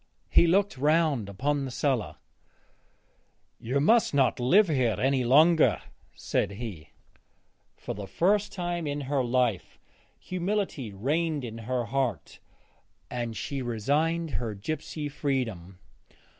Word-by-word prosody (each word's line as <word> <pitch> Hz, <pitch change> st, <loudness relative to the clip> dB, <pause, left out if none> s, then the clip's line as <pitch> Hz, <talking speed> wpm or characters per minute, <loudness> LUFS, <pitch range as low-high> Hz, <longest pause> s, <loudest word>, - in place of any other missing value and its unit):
He 170 Hz, -, +6 dB
looked 195 Hz, -4 st, +2 dB
round 150 Hz, -7 st, +2 dB
upon 140 Hz, +8 st, -1 dB
the 135 Hz, -, -4 dB
cellar. 130 Hz, -2 st, -1 dB, 1.4 s
'You 130 Hz, +5 st, -1 dB
must 220 Hz, +3 st, +3 dB
not 130 Hz, -4 st, +2 dB
live 185 Hz, +12 st, +5 dB
here 130 Hz, -8 st, +1 dB
any 135 Hz, -1 st, +2 dB
longer,' 155 Hz, +6 st, +5 dB, 0.4 s
said -, -, -1 dB
he. 100 Hz, -7 st, -7 dB, 0.9 s
For -, -, -5 dB
the 100 Hz, 0 st, -7 dB
first 205 Hz, -, +1 dB
time 175 Hz, -3 st, -3 dB
in 145 Hz, 0 st, -2 dB
her 135 Hz, -1 st, 0 dB
life 120 Hz, -5 st, 0 dB, 0.4 s
humility 185 Hz, -, -3 dB
reigned 145 Hz, -, -1 dB
in 115 Hz, -1 st, -7 dB
her 125 Hz, -2 st, 0 dB
heart 125 Hz, -, -2 dB, 0.7 s
and 120 Hz, -3 st, -4 dB
she 135 Hz, +6 st, -4 dB
resigned 150 Hz, +8 st, 0 dB
her 115 Hz, -5 st, -3 dB
gypsy 150 Hz, +7 st, -4 dB
freedom. 120 Hz, -, -3 dB
135 Hz, 120 wpm, -27 LUFS, 120-160 Hz, 1.4 s, He